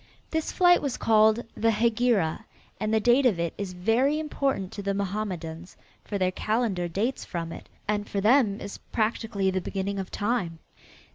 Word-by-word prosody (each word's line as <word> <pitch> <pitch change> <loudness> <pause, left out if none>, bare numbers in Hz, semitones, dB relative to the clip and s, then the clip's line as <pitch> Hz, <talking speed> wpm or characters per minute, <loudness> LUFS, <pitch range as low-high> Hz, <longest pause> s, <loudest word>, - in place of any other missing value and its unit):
This 320 -1 -1
flight 355 -1 +5
was 280 -4 -2
called 220 +1 +4
the 225 - +2
"Hegira," 225 -5 +1 0.4
and 215 0 -1
the 220 - +3
date 245 +4 +4
of 195 -8 +1
it 170 -1 -1
is 195 -2 -4
very 230 +11 +2
important 275 -10 -1
to 205 - -6
the 200 0 -1
Mohammedans, 185 -4 -4 0.3
for 205 - -3
their 185 -1 +1
calendar 210 -3 -1
dates 215 +10 -2
from 165 -2 -5
it, - - -10 0.2
and 205 0 -1
for 200 - -1
them 215 -1 +4
is 200 - -7
practically 215 -3 -1
the 185 0 -1
beginning 195 +2 -3
of 190 - -4
time. 205 -6 -1
210 Hz, 170 wpm, -27 LUFS, 190-235 Hz, 0.4 s, flight